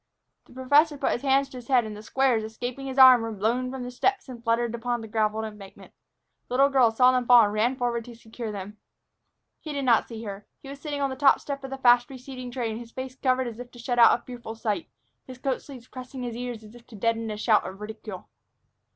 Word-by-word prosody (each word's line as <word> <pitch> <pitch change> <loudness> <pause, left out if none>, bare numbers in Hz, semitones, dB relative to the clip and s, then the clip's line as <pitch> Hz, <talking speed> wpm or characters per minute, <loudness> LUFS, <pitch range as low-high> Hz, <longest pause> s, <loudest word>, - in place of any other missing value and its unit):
The - - -17
professor 285 +4 +3
put 275 - 0
his 240 - -2
hands 275 0 +2
to 260 - -10
his 245 -1 -11
head, 250 -4 +3
and 215 -1 -7
the 210 - -9
squares, 245 0 +1
escaping 245 +5 -6
his 265 0 -6
arm, 260 -2 +9
were 225 0 -4
blown 230 +5 -1
from 260 -1 -6
the 245 - -6
steps 390 +10 0
and 240 -3 -10
fluttered 230 0 0
upon 240 +1 -2
the 225 - -8
graveled 220 0 0
embankment. 210 -3 -11 0.5
The 250 - -4
little 275 +2 +5
girl 260 -4 +4
saw 250 +3 +4
them 250 -1 0
fall 245 -2 +8
and 205 -1 0
ran 230 +5 +1
forward 240 -2 -1
to 240 -1 -11
secure 225 0 -7
them. 205 +1 -7 0.8
He 305 - -7
did 280 -1 -2
not 235 -3 +4
see 230 -1 -8
her. 200 -1 -8
He 270 - -12
was 280 0 -9
sitting 290 -2 -4
on 275 -1 0
the - - -4
top 270 +1 +4
step 275 -1 -6
of 270 - -6
the 270 - -5
fast 245 -2 +4
receding 255 -1 -8
train, 235 -3 -3
his 235 -1 -10
face 260 0 -7
covered 260 -1 +1
as 235 -1 -7
if 245 0 -8
to 245 - -16
shut 245 0 -2
out 235 - +7
a - - -25
fearful 240 -3 -8
sight, 210 -5 -3 0.4
his 255 -1 -9
coat 260 0 -2
sleeves 255 -4 -12
pressing 255 0 -8
his 240 -2 -4
ears 240 -2 -5
as 215 +1 -14
if 240 -1 -16
to 230 - -13
deaden 225 +2 -1
a 210 - -4
shout 215 0 +3
of 190 +1 -8
ridicule. 210 -3 -8
245 Hz, 250 wpm, -26 LUFS, 225-260 Hz, 0.8 s, arm